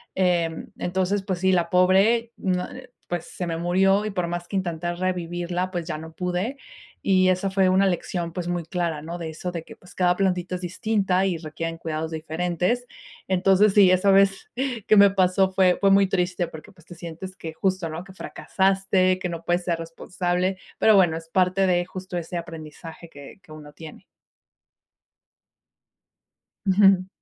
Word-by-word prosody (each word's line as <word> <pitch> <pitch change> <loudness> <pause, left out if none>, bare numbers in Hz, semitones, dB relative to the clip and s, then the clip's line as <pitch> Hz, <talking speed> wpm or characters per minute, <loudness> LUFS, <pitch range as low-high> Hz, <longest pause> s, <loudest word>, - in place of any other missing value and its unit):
Mm 175 -3 0
entonces 190 +2 -1
pues 190 -3 -3
sí, 190 +1 +2
la 175 -2 +1
pobre, 195 +6 +3
mm, 185 -2 0 0.2
eh, 255 0 -11 0.2
pues 175 -1 -3
se 180 - -6
me 165 -1 -2
murió 190 +4 +2
y 215 - -2
por 180 -3 -2
más 175 0 -4
que 200 - -6
intenté 175 -2 -2
revivirla, 175 0 -2
pues 175 -2 -4
ya 155 - -3
no 160 +1 -10
pude. 180 - -3 0.4
Y 185 -1 +3
esa 185 +1 +1
fue 190 -1 +2
una 190 +1 +4
lección, 175 -2 -2
pues 175 -1 -4
muy 175 -1 -2
clara, 170 -3 -2
¿no? 165 +3 -6
de 165 -2 -5
eso 170 +3 -5
de 170 -2 -5
que - - -13
pues 180 - -18
cada 180 -1 +2
plantita 180 -2 0
es 180 - -6
distinta 190 0 0
y 180 -4 0
requieren 165 +1 -5
cuidados 160 -1 -4
diferentes. 175 +8 -1 0.4
Entonces 190 +2 +3
sí, 200 -2 +6
esa 185 +2 +4
vez 195 0 +3 0.4
que 215 - +5
me 200 0 +8
pasó 190 0 +2
fue 185 -1 +3
fue 200 - +4
muy 195 0 +5
triste 180 -2 -1
porque 160 +6 -12
pues 165 -3 -22
te 175 - -12
sientes 170 +3 -8
que 160 -1 -7
justo, 185 0 -1
¿no?, 160 +2 -6
que 195 - -14
fracasaste, 190 -1 +1
que 180 - -3
no 170 -1 -6
puedes 175 +1 +1
ser 170 -2 -1
responsable, 180 +3 -2 0.2
pero 220 - +5
bueno, 175 -4 +4
es 165 0 -11
parte 185 +2 +2
de 175 -1 +2
justo 185 -1 -7
ese 170 +1 -5
aprendizaje 165 0 -9
que 140 +2 -12
que 180 - -19
uno 150 -1 -12
tiene. 160 +2 -12 2.6
Ujú. 195 -1 +4
180 Hz, 180 wpm, -24 LUFS, 170-190 Hz, 2.6 s, me